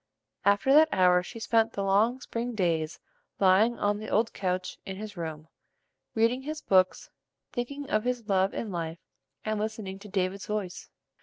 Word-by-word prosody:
After 200 +7 +4
that 315 +2 +7
hour 180 -1 +5
she 230 +6 -9
spent 225 0 +2
the 200 - -2
long 210 +6 +3
spring 240 -1 -4
days 165 -5 0 0.4
lying 200 +5 +4
on 205 0 0
the 215 - -6
old 225 +2 +1
couch 185 -1 -2
in 190 - -6
his 210 +1 -7
room, 160 -2 -6 0.7
reading 230 +3 +2
his 305 +3 -5
books, 185 -7 +2 0.4
thinking 280 +4 -4
of 215 -3 +1
his 245 -3 -2
love 190 -1 +2
and 220 - -4
life, 165 -2 -3 0.5
and 215 -1 -1
listening 210 -3 -4
to 210 +1 -11
"David's 190 0 -2
voice." 205 -4 -4
205 Hz, 165 wpm, -28 LUFS, 185-230 Hz, 0.7 s, that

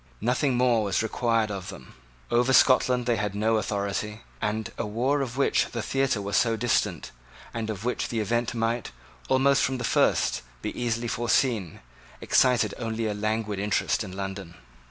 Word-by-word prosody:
Nothing 125 +3 +1
more 120 -3 +3
was 100 +2 0
required 115 -1 0
of 95 -2 -5
them. 65 - -11 0.4
Over 125 +2 +3
Scotland 125 -2 +4
they 120 -1 +1
had 105 -1 -2
no 110 +2 +2
authority; 105 +1 -3 0.2
and 105 +1 -2
a - - -3
war 125 +7 0
of 130 -1 -4
which 140 - +2
the 115 -3 -5
theatre 135 -6 0
was 100 0 -2
so 115 -2 +3
distant, 110 -6 0 0.4
and 115 -1 -3
of 105 0 -5
which 125 - -1
the 115 - -2
event 115 +2 -1
might, 115 +1 -1 0.4
almost 135 +1 +4
from 130 0 0
the 125 - -5
first, 115 - +2 0.2
be - - -4
easily 120 -1 -1
foreseen, 115 - 0 0.4
excited 120 -5 +3
only 115 -1 -2
a 105 - -1
languid 105 0 -2
interest 105 +2 0
in 95 -3 -8
London. 95 -3 -6
115 Hz, 170 wpm, -26 LUFS, 105-120 Hz, 0.4 s, Scotland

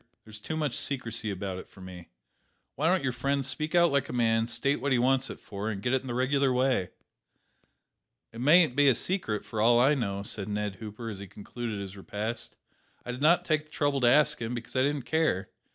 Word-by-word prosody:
"There's 110 -1 -10
too 160 +8 -4
much 150 -5 -1
secrecy 115 -5 -2
about 95 -1 -4
it - - -11
for - - -18
me. 90 -2 -10 0.7
Why 150 +4 0
don't 185 -3 +2
your 130 - 0
friend 140 +3 -1
speak 155 +6 -1
out 170 -2 +5
like 140 -1 0
a - - -5
man; 115 -2 +2
state 120 +3 0
what 140 +1 -1
he 130 - +4
wants 130 +2 +2
it - - -8
for, 100 +2 -5
and 100 -3 -4
get 120 +6 -1
it 130 - +2
in 135 - -11
the 120 - -3
regular 135 +1 +2
way?" 125 -7 +1 1.4
"It 115 - -7
mayn't 155 0 +5
be 145 0 +4
a 130 - +5
secret, 115 - -1
for 110 - -3
all 120 +2 +5
I 135 +4 +5
know," 100 -7 -2
said 100 0 -3
Ned 105 -1 -3
Hooper, 110 +1 -8
as 100 -3 -6
he 100 - -8
concluded 105 +2 -6
his 100 -1 -7
repast. 110 +4 -4 0.5
"I 125 - -4
did 125 +2 -7
not 165 +4 +4
take 155 -1 0
the - - -26
trouble 145 -2 0
to 120 - +4
ask 150 +2 +4
him; 115 +2 -3
because 120 +2 -8
I 130 - +3
didn't 140 -1 0
care. 125 - 0
125 Hz, 230 wpm, -28 LUFS, 105-140 Hz, 1.4 s, out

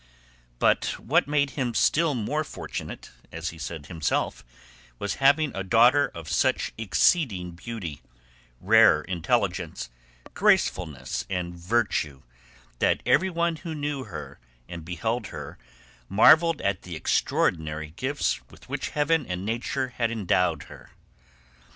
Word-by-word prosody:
But - - +2
what - - +2
made 145 -1 +1
him 125 -5 -2
still 160 -2 +3
more 145 +7 -1
fortunate, - - -7 0.2
as 80 0 -4
he 80 - -11
said 80 -3 -6
himself, 70 -6 -2 0.5
was 100 - -3
having 140 +2 +4
a 95 - -3
daughter 120 +9 +5
of 85 -2 -8
such - - +1
exceeding 110 - +1
beauty, 85 -4 -7 0.6
rare - - +5
intelligence, 85 -7 -1 0.4
gracefulness, 75 -8 +1
and 90 -2 -3
virtue, 85 - -1 0.6
that - - +2
everyone 170 -2 +2
who 165 -1 -6
knew 145 -3 -3
her - - -8 0.3
and 85 -2 -8
beheld 110 +8 -2
her - - -8 0.5
marvelled 155 +9 +6
at 100 -2 -1
the 90 -2 -8
extraordinary 80 0 0
gifts 140 - -1
with - - -17
which - - -3
heaven 150 -1 +2
and 90 +1 -4
nature 120 +4 -2
had 115 -2 +1
endowed 90 -6 +1
her. - - -14
110 Hz, 125 wpm, -26 LUFS, 85-145 Hz, 0.6 s, marvelled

